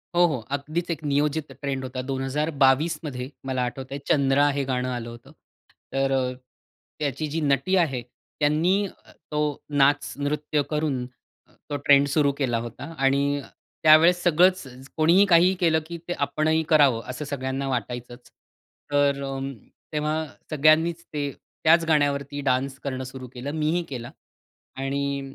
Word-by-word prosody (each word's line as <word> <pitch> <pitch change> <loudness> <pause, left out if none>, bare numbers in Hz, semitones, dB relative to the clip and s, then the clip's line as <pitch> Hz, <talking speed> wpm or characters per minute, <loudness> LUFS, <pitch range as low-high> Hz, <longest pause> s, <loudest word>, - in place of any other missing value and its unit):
हो, 175 0 +6
हो. 150 -7 0
अगदीच 155 +5 -3
एक 160 -1 -4
नियोजित 150 +1 0
ट्रेंड 135 -2 -4
होता. 130 0 -4
2022मध्ये 135 +1 0 0.2
मला 130 -1 -1
आठवतंय, 130 +2 -6
चंद्रा 140 0 +3
हे 140 - +1
गाणं 130 -1 -1
आलं 120 -2 -4
होतं. 115 0 -13 0.6
तर 135 0 +1
अ, 130 -1 +1 0.7
त्याची 150 +1 -2
जी 160 +3 -2
नटी 150 +6 +2
आहे, 135 -9 +1 0.4
त्यांनी 170 +7 +2 0.4
तो 150 - -1 0.3
नाच, 145 0 +2
नृत्य 150 +1 -1
करून 150 -5 -1 0.6
तो 145 - -2
ट्रेंड 140 0 +6
सुरु 140 0 +2
केला 125 -5 0
होता 120 +8 -7
आणि 140 +1 +1 0.4
त्यावेळेस 165 +3 +6
सगळंच 180 +2 +4 0.3
कोणीही 170 +6 +5
काहीही 180 0 +5
केलं, 165 -3 +3
की 170 0 -6
ते 175 - -1
आपणही 155 +2 0
करावं, 140 -7 +5
असं 130 +4 -5
सगळ्यांना 135 -1 -3
वाटायचच. 120 -1 -5 0.6
तर 140 -1 +2
अं, 135 0 -4 0.4
तेव्हा 155 +1 -1 0.3
सगळ्यांनीच 155 +3 +3
ते 145 -1 -2 0.3
त्याच 165 +1 +5
गाण्यावरती 145 -2 +1
डान्स 135 0 0
करणं 130 -2 -3
सुरु 130 0 -8
केलं. 130 +3 -5
मीही 160 +3 0
केला. 120 -3 -6 0.6
आणि 140 +1 -2
145 Hz, 135 wpm, -25 LUFS, 135-155 Hz, 0.7 s, हो